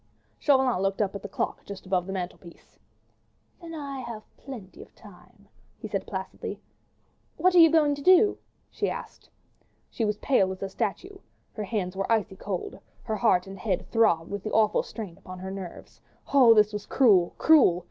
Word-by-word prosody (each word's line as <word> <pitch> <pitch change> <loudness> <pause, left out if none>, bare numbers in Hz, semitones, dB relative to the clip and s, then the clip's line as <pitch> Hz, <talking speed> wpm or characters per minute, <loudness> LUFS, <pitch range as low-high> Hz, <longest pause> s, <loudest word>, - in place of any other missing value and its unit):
'" - - -40
Chauvelin 265 -8 +3
looked 195 0 -1
up 200 -3 0
at 200 - -6
the 205 - -8
clock - - -3
just 200 -1 -9
above 185 -1 0
the - - -4
mantelpiece. 180 -2 -8 0.8
"Then 330 -1 -8
I 280 -3 -6
have 230 -4 -7
plenty 230 -9 -10
of - - -15
time," 200 0 -18 0.3
he - - -7
said 195 -2 -4
placidly. 190 -1 -6 0.8
"What 370 0 +3
are 360 - +6
you 325 -1 +9
going 305 -2 +3
to 285 - -6
do?" 370 +6 +5 0.3
she - - -1
asked. - - -8 0.6
She 230 - -3
was 210 -1 0
pale 195 -8 +2
as 190 +1 -7
a 195 - -3
statue, 380 - -4 0.3
her 215 - -5
hands 190 -3 -3
were 195 +3 -2
icy 210 -3 +1
cold, 190 -2 -5 0.2
her 220 - -3
head 185 -6 +3
and 195 0 -10
heart 190 -4 -2
throbbed 200 -8 +2
with 200 -1 -4
the 215 - -5
awful 215 -1 +3
strain 205 -7 -8
upon 185 0 -10
her 190 +1 -7
nerves. 190 -3 -9 0.3
Oh, 250 -5 +7
this 210 0 +4
was 210 -1 -5
cruel! 200 -10 +4
cruel! 285 - +5
210 Hz, 190 wpm, -26 LUFS, 190-255 Hz, 0.8 s, you